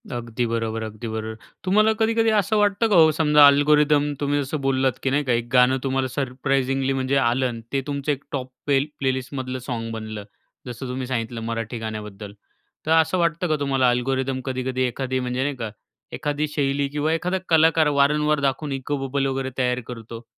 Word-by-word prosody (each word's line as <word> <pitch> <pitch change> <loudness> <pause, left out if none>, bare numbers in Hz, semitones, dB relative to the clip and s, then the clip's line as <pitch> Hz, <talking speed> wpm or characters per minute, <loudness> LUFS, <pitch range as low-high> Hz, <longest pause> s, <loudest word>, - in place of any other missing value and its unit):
अगदी 120 -1 -3
बरोबर, 115 -1 -2
अगदी 110 +2 -7
बरोबर. 110 0 -4 0.3
तुम्हाला 215 +4 +4
कधी-कधी 225 0 +2
असं 210 +2 +1
वाटतं 205 +2 +2
का 210 - +3
हो 160 -2 +7
समजा 150 -1 +5
अल्गोरिथम 145 +1 +4
तुम्ही 145 0 0
जसं 140 +2 -4
बोललात, 135 -1 +1
की 135 - +1
नाही 145 +2 +1
का 130 -3 +1
एक 120 0 -1
गाणं 125 +1 +5
तुम्हाला 135 -1 0
सरप्राइजिंगली 135 0 -1
म्हणजे 135 +1 0
आलं, 130 0 +2
अन् 115 -2 -6
ते 135 - +1
तुमचं 140 0 -1
एक 140 -1 -4
टॉप 130 -2 -4 0.2
पेल 140 0 +2
प्लेलिस्टमधलं 130 -1 -2
सॉंग 115 -2 -3
बनलं. 110 -1 -6 0.4
जसं 125 +2 -6
तुम्ही 125 0 -4
सांगितलं 115 -2 -3
मराठी 115 +1 -4
गाण्याबद्दल, 105 -2 -7 0.5
तर 155 - -1
असं 160 +2 +4
वाटतं 170 0 0
का 155 - +1
तुम्हाला, 135 -3 +2
अल्गोरिथम 130 +2 -1
कधी-कधी 130 -1 -2
एखादी 130 +1 -1
म्हणजे 125 +1 -2
नाही 145 0 -2
का 115 -4 -5 0.4
एखादी 150 0 -2
शैली 140 -1 0
किंवा 150 +2 0
एखादा 180 +3 -1
कलाकार 160 -1 +4
वारंवार 150 +1 +3
दाखवून 140 +2 -1
इको 135 +2 -2
बबल 135 +1 -1
वगैरे 135 0 -2
तयार 125 -1 +1
करतो? 115 -1 -8
135 Hz, 180 wpm, -23 LUFS, 125-145 Hz, 0.5 s, हो